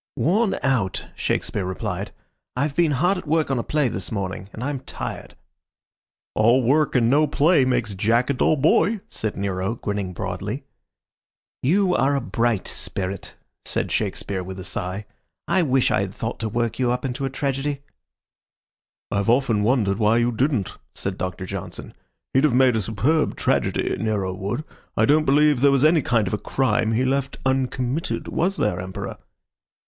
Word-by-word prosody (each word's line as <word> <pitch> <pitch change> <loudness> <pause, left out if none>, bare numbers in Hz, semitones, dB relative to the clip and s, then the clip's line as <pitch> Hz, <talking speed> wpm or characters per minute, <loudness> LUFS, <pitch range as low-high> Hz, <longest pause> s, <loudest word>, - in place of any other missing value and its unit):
"Worn 200 +6 +2
out," 125 -9 0
Shakespeare 100 - -1
replied. 95 +1 -4 0.4
"I've 140 +2 -1
been 165 -4 +3
hard 180 +8 +2
at 170 - -11
work 155 -2 +1
on 130 - +1
a - - -2
play 150 -3 +1
this 95 -5 -4
morning, 95 -2 -4
and 110 - -7
I'm 140 0 -2
tired." 130 - -7 1.0
"All 120 +4 +4
work 145 +5 +2
and 120 -3 +4
no 150 +5 +4
play 150 0 +4
makes 120 -5 0
Jack 115 +7 +2
a - - +1
dull 140 - +3
boy," 185 +8 +3
said 110 -1 -4
Nero, 95 +1 -1
grinning 100 -4 -3
broadly. - - -4 1.0
"You 185 +7 +3
are 140 -2 +2
a - - +2
bright 120 -5 0
spirit," 95 -1 -4 0.3
said - - -3
Shakespeare, 95 -2 -2
with 95 +1 -7
a 95 - -6
sigh. 95 0 -4 0.4
"I 190 - +3
wish 135 -5 +2
I 105 - +2
had 100 -1 -4
thought 115 +1 -4
to 110 - -2
work 115 +2 -1
you 125 -2 +2
up 125 +2 -2
into 130 +1 -3
a - - -1
tragedy." 140 +1 -2 1.3
"I've 100 +2 0
often 120 -3 +3
wondered 105 -3 +2
why 110 +1 +4
you 120 +1 +2
didn't," 120 - 0 0.2
said 100 -1 -3
Doctor 95 0 -4
Johnson. - - -7 0.4
"He'd 135 - +4
have 135 -5 +2
made 130 -2 +5
a 110 - +1
superb 120 +10 +1
tragedy, - - 0
Nero 105 -4 -1
would. 100 +10 -3 0.3
I - - +5
don't 155 +2 +4
believe 145 -1 +4
there 140 - +6
was 140 +1 +4
any 160 0 +5
kind 115 -4 +1
of 95 - -3
a 105 - 0
crime 115 -4 +1
he 125 +4 +2
left 135 +1 -1
uncommitted. 130 +2 -1
Was 190 +4 0
there, 95 -4 0
Emperor?" 95 +1 -6
125 Hz, 175 wpm, -23 LUFS, 105-140 Hz, 1.3 s, there